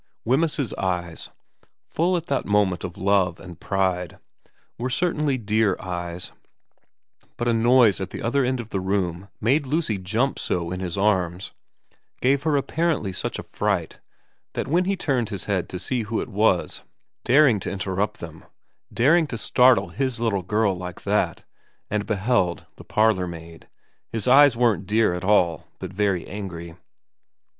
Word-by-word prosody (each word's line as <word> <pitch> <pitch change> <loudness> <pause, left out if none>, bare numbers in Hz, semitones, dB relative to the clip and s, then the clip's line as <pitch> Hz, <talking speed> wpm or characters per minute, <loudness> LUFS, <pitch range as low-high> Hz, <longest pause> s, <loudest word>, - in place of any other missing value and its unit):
Wemyss's 140 0 +1
eyes, 90 -3 -3 0.6
full 175 +3 +1
at 170 - -5
that 140 -4 -1
moment 100 -3 +2
of 95 -1 -6
love 95 -2 +1
and 90 -3 -11
pride, 95 -3 -1 0.6
were 125 +2 -2
certainly 150 -1 0
dear 110 -3 +1
eyes, 90 -1 -5 1.1
but 120 - -2
a 120 - +3
noise 115 -2 +4
at 95 - -3
the - - -7
other 135 +4 +1
end 130 0 0
of 115 -2 -7
the 95 - -1
room 95 -1 -2
made 135 +6 +2
Lucy 140 - 0
jump 110 +9 -1
so 85 -1 -2
in 90 - -3
his 90 -1 -4
arms, 95 -3 0 0.7
gave 135 +2 +2
her 155 -2 +1
apparently 140 - -1
such - - -4
a - - -6
fright, - - -2 0.5
that - - -3
when 175 +5 +2
he 195 +1 +1
turned 130 - -1
his 100 -5 -5
head 95 -4 -1
to 90 - -5
see 120 +6 -1
who 110 +1 -2
it - - -4
was 105 -4 +1 0.4
daring 130 -4 +5
to - - -4
interrupt 100 +1 -2
them, 80 -1 -9 0.5
daring 155 +7 +3
to 120 - -5
startle 120 -5 +4
his 130 +5 -2
little 110 -5 0
girl 105 +1 +1
like 90 -1 -7
that, - - 0 0.5
and 105 0 -1
beheld 100 -4 0
the - - -11
parlour 105 -4 +2
maid, 85 -1 -10 0.4
his 115 -1 -3
eyes 135 -1 +7
weren't 115 -5 +2
dear 110 -2 +3
at 90 +1 -4
all 90 -5 +2
but 95 -1 -7
very 100 -3 0
angry. 85 -4 -7
105 Hz, 160 wpm, -24 LUFS, 90-125 Hz, 1.1 s, eyes